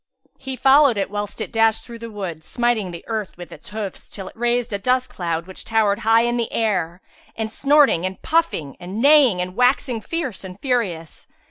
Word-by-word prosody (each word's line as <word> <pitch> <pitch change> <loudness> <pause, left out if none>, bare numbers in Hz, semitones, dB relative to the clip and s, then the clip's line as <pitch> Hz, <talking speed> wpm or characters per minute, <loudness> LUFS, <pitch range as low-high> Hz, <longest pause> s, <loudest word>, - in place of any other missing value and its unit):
He 265 -1 -5
followed 270 -2 +5
it 195 0 -2
whilst 205 +1 -4
it - - -4
dashed 225 -1 +2
through 235 -1 -10
the 230 0 -7
wood, 185 -7 -6
smiting 240 -4 0
the 170 -1 -8
earth 215 -5 -4
with 175 -1 -10
its - - -11
hoofs 210 -3 -6
till 195 -2 -8
it - - -11
raised 240 0 0
a 200 - -1
dust 255 +4 0
cloud 170 -2 -3
which 190 0 -8
towered 215 -2 +1
high 225 +1 +4
in 240 0 0
air; 185 -6 -1 0.3
and 220 -1 -3
snorting 280 - +4
and 185 0 -4
puffing 315 - 0
and 185 +4 -6
neighing 275 -7 +5
and 180 +1 -5
waxing 250 -1 +2
fierce 285 - -4
and 185 0 -9
furious. 200 - -2
220 Hz, 195 wpm, -21 LUFS, 190-245 Hz, 0.3 s, followed